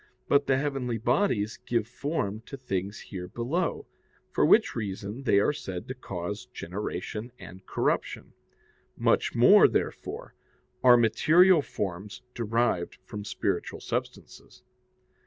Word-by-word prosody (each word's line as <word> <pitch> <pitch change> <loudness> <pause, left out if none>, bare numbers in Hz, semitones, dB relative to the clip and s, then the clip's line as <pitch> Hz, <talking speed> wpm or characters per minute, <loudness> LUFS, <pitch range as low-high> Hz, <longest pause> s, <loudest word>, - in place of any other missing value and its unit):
But 140 0 +3
the 135 - +3
heavenly 135 -4 -2
bodies 120 - 0
give 115 -3 0
form 115 -5 -3
to 140 - -7
things 100 -5 -4
here 90 -2 -7
below, 145 - -2 0.5
for - - +1
which - - +4
reason 105 +3 -4
they 100 -4 +4
are 125 - +2
said 95 -11 -6
to 130 - -4
cause 105 -1 -6
generation 105 +1 -5
and 95 0 -12
corruption. - - -2 0.6
Much - - +1
more, - - +7
therefore, - - -3 0.5
are 125 -1 +8
material 160 - +5
forms 100 -5 -5
derived 115 -5 0
from 105 0 -7
spiritual 105 - -2
substances. - - -6
115 Hz, 120 wpm, -28 LUFS, 100-130 Hz, 0.6 s, are